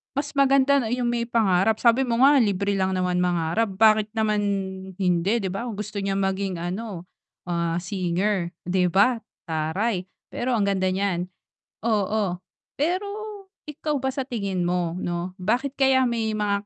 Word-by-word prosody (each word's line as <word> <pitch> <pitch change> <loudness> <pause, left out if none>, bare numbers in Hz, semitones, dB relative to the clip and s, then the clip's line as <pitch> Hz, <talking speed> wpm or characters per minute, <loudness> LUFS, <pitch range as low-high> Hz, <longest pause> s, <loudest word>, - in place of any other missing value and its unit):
mas 280 - -1
maganda 275 0 +4
na 230 - -2
'yong 250 -1 0
may 235 -1 0
pangarap. 220 -2 +3
Sabi 240 +2 +4
mo 235 0 0
nga 285 +1 +7
libre 200 -2 +1
lang 190 0 +1
naman 180 -1 0
mangarap, 180 +4 +1
bakit 215 +1 +4
naman 215 -1 +1 0.5
hindi, 180 0 +1
'di 190 - -2
ba? 230 +6 -4
Kung 230 - -5
gusto 210 0 -5
niyang 195 0 -1
maging 190 0 -1
ano, 185 0 -4 0.5
ah, 170 -1 0
singer, 185 0 -1
'di 180 0 +1
ba, 230 +5 +4 0.3
taray. 180 +6 -1 0.3
Pero 250 +1 -1
ang 210 - +1
ganda 190 -1 +1
niyan. 185 -2 -1 0.6
Oo. 210 -4 +1 0.4
Pero 360 +7 0 0.6
ikaw 300 0 -2
ba 265 - 0
sa 270 -2 -3
tingin 200 -7 -2
mo 175 -2 0
'no, 175 +1 -3
bakit 245 +8 0
kaya 265 -1 +4
may 230 -2 -1
mga 205 -1 -1
200 Hz, 160 wpm, -24 LUFS, 180-235 Hz, 0.6 s, nga